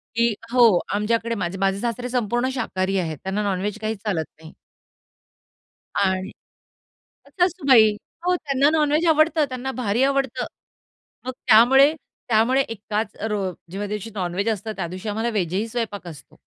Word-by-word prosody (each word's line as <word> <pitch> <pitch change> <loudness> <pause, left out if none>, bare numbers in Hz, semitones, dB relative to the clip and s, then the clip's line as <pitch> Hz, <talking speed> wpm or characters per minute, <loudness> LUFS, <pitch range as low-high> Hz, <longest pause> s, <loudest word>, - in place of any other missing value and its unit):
की 235 0 +2 0.2
हो. 230 -8 +6
आमच्याकडे 230 +2 0
माझे 195 -1 -3
माझे 195 0 +1
सासरे 245 +2 -3
संपूर्ण 240 +1 0
शाकाहारी 195 -5 -1
आहेत, 160 -4 -3
त्यांना 195 +2 -2
नॉन-व्हेज 200 +2 -2
काही 220 +1 -2
चालत 195 -6 -2 0.2
नाही. 160 - -12 1.4
आणि 190 -1 0 1.0
सासूबाई. 280 - +4 0.3
हो 360 - +3
त्यांना 280 -2 +1
नॉन-व्हेज 310 +1 +2
आवडतं, 310 0 +4
त्यांना 255 +1 -4
भारी 240 -1 0
आवडतं. 270 -2 0 0.8
मग 255 - -3
त्यामुळे 270 +7 +7 0.4
त्यामुळे 235 +4 +3
एकाच 215 -1 -4
रो 210 - -1 0.3
जेव्हा 200 +2 -4
दिवशी 210 +2 -5
नॉन-व्हेज 190 +2 -2
असतं, 220 0 -2
त्या - - -3
दिवशी 185 +4 -7
आम्हाला 225 +3 -1
व्हेज 180 -6 -1
ही 210 +4 0
स्वयंपाक 220 -5 -4
असतो. 155 -5 -13
220 Hz, 140 wpm, -23 LUFS, 200-255 Hz, 1.4 s, त्यामुळे